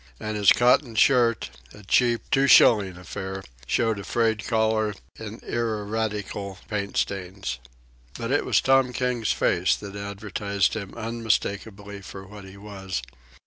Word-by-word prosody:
And 110 0 -4
his 100 -2 +5
cotton 120 0 +3
shirt, 115 - +3 0.2
a 105 - -14
cheap, 120 +4 +2
two 140 -2 +4
shilling 100 -8 +6
affair, 95 +2 -6 0.2
showed 115 -3 +1
a - - -6
frayed 110 0 0
collar 110 -2 +1 0.2
and 110 0 -8
ineradicable 105 -3 -3
paint 100 -2 -3
stains. 95 -7 -3 0.6
But 115 +1 -4
it 145 - +2
was - - +2
Tom 135 -1 +3
King's 125 -3 0
face 90 +1 +2
that 100 -1 -9
advertised 100 -1 -2
him 100 -3 -6
unmistakably 105 -3 -2
for 95 0 -10
what 100 0 -11
he 95 +1 -12
was. 95 -7 -6
105 Hz, 140 wpm, -25 LUFS, 100-115 Hz, 0.6 s, shilling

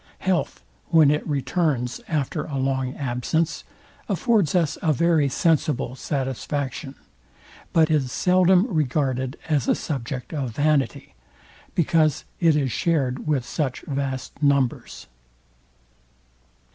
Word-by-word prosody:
Health, 185 -2 -1 0.2
when 160 -3 +5
it 150 - -1
returns 135 -3 -1
after 150 -5 -2
a 140 -3 -4
long 130 -1 -1
absence, 140 +5 -1 0.5
affords 215 - +2
us 165 -5 +2
a 160 - +2
very 160 -2 +2
sensible 150 -4 +1
satisfaction; 135 0 -3 0.8
but 160 -1 +3
is 140 -5 +1
seldom 185 - +4
regarded 135 - -1
as 145 -7 +1
a - - +3
subject 130 -2 -5
of 130 -7 -3
vanity, 145 -5 0 0.6
because 155 -2 +2
it 165 -3 +4
is 135 -4 0
shared 140 -6 0
with 140 -5 +1
such 135 -3 -2
vast 135 -1 -4
numbers. 140 -4 0
145 Hz, 110 wpm, -24 LUFS, 130-160 Hz, 0.8 s, when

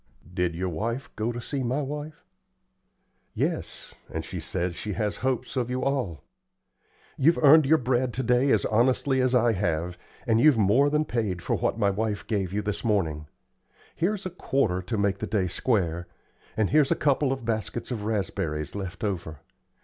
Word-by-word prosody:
"Did 90 -2 0
yer 95 +2 -2
wife 115 - -4
go 110 +2 -1
to 120 - -5
see 135 +3 -4
my 130 +4 -1
wife?" 150 +5 -6 1.1
"Yes, - - -3 0.2
and - - -4
she - - -6
says 90 -1 -3
she 105 +2 -4
has 105 -1 -2
hopes 130 +1 -2
of 125 -2 -1
you 125 +1 -2
all. 130 - -1 0.9
You've 160 +4 +4
earned 150 0 +7
your 160 +3 +6
bread 125 -1 0
to 130 - -1
day 125 +3 +3
as - - +3
honestly 130 +4 +2
as 130 0 +2
I 120 -1 +4
have, 90 -4 -1 0.3
and 115 -2 +3
you've 150 -3 +6
more 110 +8 +4
than 150 +1 +1
paid 105 - -2
for - - 0
what - - -1
my 100 -3 +2
wife 105 0 -2
gave 100 -5 -1
you 105 +1 -1
this 105 0 -3
morning. 80 -9 0 0.7
Here's 190 +3 -1
a 185 - -3
quarter 130 - 0
to 95 +5 -3
make 100 -1 +1
the - - -3
day 105 -4 +1
square, 90 -4 0 0.5
and 110 -3 +1
here's 150 -2 +4
a - - +3
couple 140 -1 +2
of 130 -3 -3
baskets 115 +2 -3
of 110 -4 -3
raspberries 95 -8 -2
left 95 -1 -6
over. 85 -7 -3
115 Hz, 180 wpm, -26 LUFS, 95-130 Hz, 1.1 s, earned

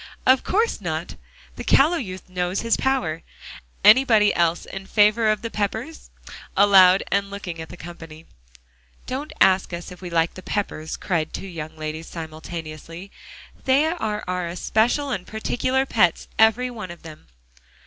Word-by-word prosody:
"Of 260 0 +5
course 445 +4 0
not. - - -4 0.4
The - - -5
callow 315 +6 +4
youth 185 - -7
knows 180 0 -2
his 230 0 +2
power. 175 -13 -1 0.6
Anybody 220 -2 +6
else 170 0 +1
in 195 0 -8
favor 215 +2 +3
of 215 +1 0
the 230 - -4
Peppers?" 220 +9 -4 0.5
aloud, 195 -2 +7
and 200 0 +1
looking 185 -5 -6
at 160 - -9
the 175 - -10
company. 165 -2 -11 0.8
"Don't 275 +4 -5
ask 190 -1 +3
us 170 +2 -6
if 180 - -12
we 180 - -6
like 165 -1 +1
the 185 - -10
Peppers," 170 -6 -3
cried 165 -4 -2
two - - -5
young 160 -4 -7
ladies 155 +1 -5
simultaneously. 165 +2 -8 0.5
"They 270 +3 +4
are 220 -11 -2
our 180 -1 -2
especial 225 - 0
and 185 -6 -4
particular 255 +4 -1
pets, 180 -10 +1
every 225 +3 +4
one 215 -6 -7
of 170 0 -11
them." 155 -2 -12
195 Hz, 155 wpm, -23 LUFS, 170-230 Hz, 0.8 s, aloud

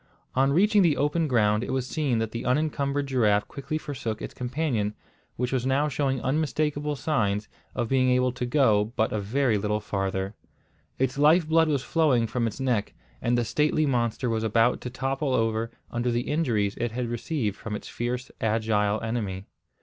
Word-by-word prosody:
On 135 +1 +3
reaching 205 +6 +4
the 165 -6 +3
open 150 +3 +1
ground 105 -4 +2
it - - -4
was 130 -1 -1
seen 135 -3 0
that 110 -1 -1
the 115 - -4
unencumbered 140 +1 0
giraffe 110 -6 +2
quickly 145 +2 -4
forsook 125 -8 -4
its - - -6
companion, 125 -5 -1 0.4
which 125 0 -2
was 130 -2 0
now 135 +3 +2
showing 135 -2 0
unmistakable 150 +1 0
signs 110 -9 0 0.3
of 120 -2 -1
being 130 +1 +2
able 125 0 +3
to 125 0 -4
go 115 -5 +3
but 110 -2 +1
a 110 - 0
very 115 +2 +1
little 105 +1 0
farther. 95 -1 -2 0.6
Its 130 +2 0
life 155 +3 +5
blood 160 0 +4
was 140 -3 0
flowing 145 -8 +2
from 115 +1 -1
its 115 - -6
neck, 125 -6 -1 0.3
and 120 +1 +1
the 120 - +1
stately 155 +4 +1
monster 120 -2 0
was 115 -1 0
about 115 +2 +2
to 125 - -5
topple 135 +2 -1
over 115 0 0 0.2
under 120 +1 -1
the 120 0 +1
injuries 120 -9 0
it 120 -1 -1
had 120 +1 -2
received 120 - -2
from 105 0 -5
its - - -7
fierce, 125 +2 -4
agile 110 -1 +1
enemy. 105 -5 -3
125 Hz, 180 wpm, -26 LUFS, 110-140 Hz, 0.6 s, life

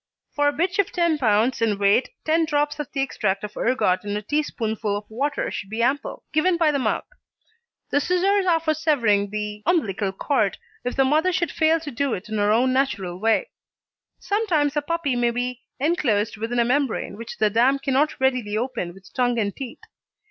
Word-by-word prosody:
For 290 0 +1
a - - +4
bitch 350 +7 -1
of 400 0 +2
10 340 -3 +1
lb. 230 0 +2
in 215 -3 +2
weight 200 +5 +3 0.2
ten 320 +1 +3
drops 295 -1 0
of 295 - -5
the 275 - -1
extract 210 -7 -1
of 210 0 -6
ergot 230 -7 +1
in 205 0 -2
a 210 - -5
teaspoonful 220 -6 -1
of 205 - -8
water 275 +7 -2
should 195 - -5
be 225 +2 -1
ample, 270 +4 -1
given 340 +3 +3
by 325 -3 +3
the 280 - 0
mouth. - - -1 0.9
The 285 - +3
scissors 375 +4 +2
are 335 -2 +4
for 315 -1 0
severing 235 -11 +2
the 210 0 -4
umbilical 205 - +1
cord 210 0 0 0.3
if 245 - -3
the 270 - +3
mother 310 +7 +3
should 340 -3 0
fail 320 +1 +3
to 300 -3 -6
do 275 0 -1
it 190 +3 -9
in 215 -1 -2
her 205 0 +3
own 250 +4 +3
natural 205 -10 -1
way. 225 - +1 0.7
Sometimes 340 -9 0
a 295 - +2
puppy 305 -3 -1
may 240 0 +2
be 245 +1 -3 0.2
enclosed 260 - +1
within 225 +3 -3
a 235 - +3
membrane 255 -5 0
which 230 +2 -8
the 215 -1 +2
dam 245 +5 +3
cannot 275 +2 0
readily 250 -6 +1
open 230 -8 -3
with 195 0 -17
tongue 245 -2 +1
and 200 -3 -1
teeth. 265 -4 -8
255 Hz, 200 wpm, -23 LUFS, 215-300 Hz, 0.9 s, a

